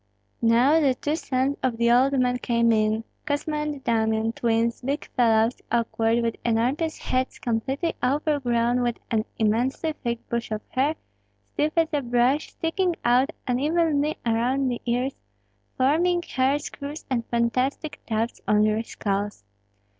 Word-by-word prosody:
Now 240 +7 +4
the 275 -5 +2
two 295 +4 -1
sons 270 -2 -1
of 250 -3 0
the 235 0 +3
old 265 +3 +4
man 250 0 +1
came 235 -1 +2
in, 215 0 +1 0.2
Kosma 300 +1 -1
and 300 -2 -3
Damian, 220 -1 +1
twins, 230 0 0
big 280 +4 -2
fellows, 225 -1 +2
awkward, 230 0 +1
with 230 -1 -1
enormous 255 +8 0
heads 255 0 -2
completely 265 +8 -1
overgrown 250 -4 +1
with 240 -1 0
an 220 -1 +1
immensely 245 +8 0
thick 235 -5 -4
bush 235 0 -3
of 215 -1 -3
hair, 280 +4 +1 0.5
stiff 305 +1 -1
as 325 -1 +3
a 290 - +1
brush, 245 +4 +1
sticking 345 +2 0
out 250 +4 +4 0.2
unevenly 300 +3 +1
around 250 +4 +1
the 240 - -3
ears, 250 +3 0 0.6
forming 345 +7 +2
hair 265 -1 +1
screws 290 +1 -7
and 240 -3 +1
fantastic 255 +6 -1
tufts 225 +1 -2
on 210 0 +4
their 215 +1 +2
skulls. 205 - -3
250 Hz, 145 wpm, -25 LUFS, 230-285 Hz, 0.6 s, Now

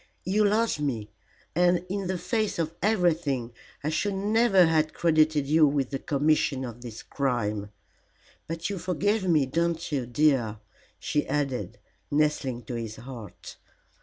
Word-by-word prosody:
You 200 +4 +2
loved 215 -3 +2
me, 115 -8 -2 0.4
and 175 0 +3
in 195 0 -3
the 185 0 -1
face 220 +2 -1
of 165 -1 -1
everything 165 - +1 0.3
I 150 - 0
should 195 +5 0
never 205 -1 +4
have 155 -1 +2
credited 155 -3 +3
you 155 +2 +5
with 140 -2 0
the 135 - -2
commission 145 -2 +1
of 120 -1 -8
this 120 -3 -8
crime. 105 -7 -1 0.8
But 165 +1 -3
you 200 -2 -3
forgive 190 +4 0
me, 155 -5 +4
don't 165 +4 -1
you, 135 -5 -1
dear?" 125 -5 +2 0.4
she 150 - -1
added, 130 -9 -2 0.3
nestling 145 -5 0
to 115 - -7
his 115 -2 -4
heart. 120 -6 -10
155 Hz, 145 wpm, -27 LUFS, 130-180 Hz, 0.8 s, you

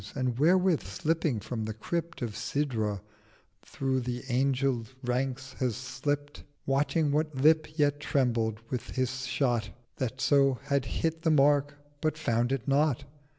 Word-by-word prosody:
'—And 130 -3 0
therewith 175 +4 +4
slipping 150 - -1
from 110 +1 -4
the 110 -1 -4
Crypt 170 +7 -3
Of 110 -4 -3
Sidra, 110 -9 -1 0.6
through 130 -1 -1
the 125 0 -4
Angel 130 -1 +1 0.2
ranks 130 +1 -2
he 130 - +2
slipt 145 +5 -3 0.2
Watching 140 +2 +1
what 155 0 0
Lip 155 +3 +3
yet 145 -1 +2
trembled 115 -6 0
with 125 -3 -4
the 130 - +2
Shot 125 -3 -1 0.3
That 130 0 -3
so 135 -2 +4
had 140 -3 0
hit 160 0 -2
the 165 - +2
Mark—but 145 +1 +1
found 120 -4 +1
it 135 -2 -2
not. 140 -1 +2
135 Hz, 140 wpm, -29 LUFS, 125-145 Hz, 0.6 s, therewith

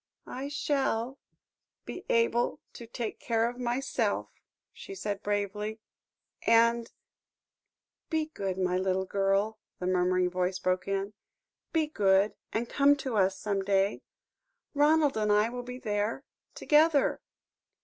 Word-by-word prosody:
"I 265 +2 -5
shall 270 -3 -1 0.7
be 365 - -7
able 230 +1 +2
to 235 - -10
take 230 -1 -5
care 230 -1 +1
of 245 +1 -6
myself," 250 +2 -1 0.4
she 390 - -9
said 205 - -3
bravely, 210 +1 -2 0.6
"and 230 0 +3 0.6
" - - -62
"Be 315 -1 0
good, 190 -2 -3
my 180 -1 +1
little 190 0 0
girl," 195 +3 0 0.2
the 180 - -5
murmuring 180 0 +2
voice 185 +1 0
broke 185 0 -1
in, 195 +1 -2 0.6
"be 320 -2 +2
good 200 -7 +3 0.2
and 235 +2 -1
come 285 +2 +4
to 265 -4 -4
us 190 -2 +2
some 200 0 -1
day 195 +1 +1 0.7
Ronald 295 0 +4
and 210 -1 +1
I 210 +2 +4
will 245 +1 -5
be 250 0 -7
there 210 +2 -2 0.3
together. 300 -1 +3
215 Hz, 130 wpm, -29 LUFS, 195-250 Hz, 0.7 s, come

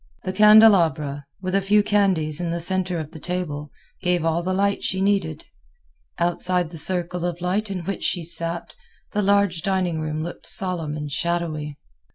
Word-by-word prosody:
The 185 - -3
candelabra, 175 -10 +5 0.2
with 185 0 -2
a 195 - +3
few 205 +2 +3
candles 185 -7 +1
in 175 - -2
the 170 +1 -2
center 185 0 -1
of 155 -1 -5
the 160 - -10
table, 150 -4 -4 0.3
gave 180 -2 +1
all 165 +1 +1
the 185 +2 -2
light 200 +1 0
she 190 - -1
needed. 190 -6 0 0.7
Outside 175 0 0
the 165 - -7
circle 180 +1 +1
of 175 -1 -2
light 190 +4 -1
in 190 -2 -3
which 195 - -4
she 175 - 0
sat, 170 +1 -3 0.4
the 210 - 0
large 200 -4 +2
dining 185 -4 0
room 155 0 -3
looked 175 - -6
solemn 170 -5 -1
and 150 -1 -5
shadowy. 155 -3 -2
175 Hz, 175 wpm, -23 LUFS, 160-190 Hz, 0.7 s, candelabra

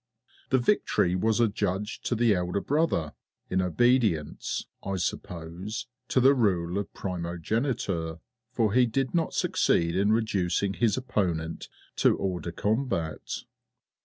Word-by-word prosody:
The 130 - +4
victory 120 - +2
was 110 +4 +1
adjudged 105 -2 0
to 120 - +1
the 115 -1 +4
elder 90 +1 0
brother 145 - 0 0.4
in 95 0 +2
obedience, 105 - +1 0.2
I 95 0 -3
suppose, 90 +5 -4 0.2
to - - +2
the 135 +2 +6
rule 95 -7 +1
of 100 - -5
Primogeniture, 90 - -2 0.3
for 110 -4 +1
he 125 0 +5
did 130 +3 -1
not 165 -2 0
succeed 85 0 +2
in 100 +3 +3
reducing 100 -3 +1
his 115 +1 +1
opponent 85 -10 -2 0.3
to - - +4
a - - -8
hors 95 -2 -1
de 85 - -5
combat. 105 - -2
100 Hz, 130 wpm, -28 LUFS, 90-120 Hz, 0.4 s, the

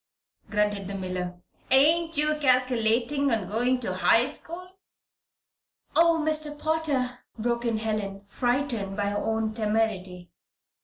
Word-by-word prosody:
grunted 205 -2 0
the 200 - -5
miller. 180 -1 -4 0.3
"Ain't 320 +5 +4
you 300 +1 +2
calculatin' 255 +1 +2
on 220 -7 -1
going 245 +5 +1
to 200 -6 -3
high 225 +5 +4
school?" 360 +6 -6 1.3
"Oh, 335 0 +5
Mr. 305 -1 +1
Potter!" 290 -6 -1 0.2
broke 235 +1 -1
in 230 -2 +1
Helen, 210 -3 -3
frightened 240 -3 -1
by 200 -1 0
her 205 - -1
own 220 0 -1
temerity. 210 -5 -2
230 Hz, 120 wpm, -26 LUFS, 205-280 Hz, 1.3 s, Oh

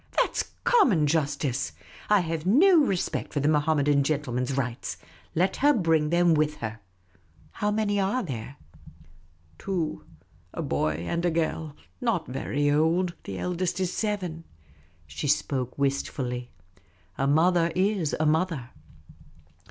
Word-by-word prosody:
That - - +2
's - - -1
common 240 - +4
justice. 140 -3 -1 0.4
I 210 -2 +5
have 165 -2 -3
no 320 - +6
respect 190 -9 -1
for 145 - 0
the 145 - +1
Mohammedan 150 -2 +3
gentleman's 135 -3 -1
rights. 125 -3 -3 0.4
Let 185 +3 +1
her 290 +2 +4
l)ring 165 - +2
them 170 0 +4
with 150 -1 +1
her. 110 -3 -6 0.7
How 210 - -1
many 210 -1 0
are 200 +7 0
there? 130 - -6 0.3
" 80 +2 -25
" 80 -1 -33
Two 180 -5 -3 0.3
— - - -33
a - - -3
boy 80 - 0
and 170 0 -1
a 175 - +3
girl; 160 -2 -2 0.3
not - - 0
very 140 +2 -1
old; 165 +4 +2
the 95 - -5
eldest 180 - -2
is 185 -1 -1
seven." 185 -7 -2 0.6
She 75 - -5
spoke 130 -3 0
wistfully. 130 -3 -2 0.7
A 135 - +2
mother 170 +3 +3
is 185 -4 +1
a 155 - +2
mother. 155 -5 0
155 Hz, 145 wpm, -26 LUFS, 140-180 Hz, 0.7 s, no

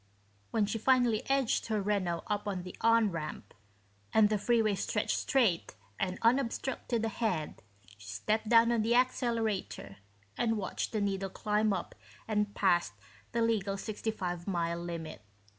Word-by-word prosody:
When 220 -2 +1
she 215 +2 -3
finally 245 -2 +3
edged 270 -3 +1
her 215 -2 0
Renault 195 -4 -1
up 210 0 -2
on 190 -3 -2
the 180 - -8
"on" 230 -2 +4
ramp 155 -3 -6 0.6
and 215 -1 +5
the 215 -1 +1
freeway 220 -1 +2
stretched 195 - -1
straight 230 - +1 0.2
and 185 -1 -1
unobstructed 240 -1 +1
ahead, 205 -8 -2 0.4
she 100 - -13
stepped 215 - -1
down 230 0 +6
on 235 -2 +2
the 230 +2 +2
accelerator 230 - 0 0.4
and 225 -2 +1
watched 195 -3 -3
the 215 - -1
needle 195 -1 -1
climb 210 +2 0
up - - -3 0.3
and 210 -2 0
past 175 -3 +2 0.4
the 235 - +1
legal 205 -3 0
65 195 -4 -4
mile 170 -2 -1
limit. 170 -5 -6
210 Hz, 145 wpm, -31 LUFS, 185-230 Hz, 0.6 s, down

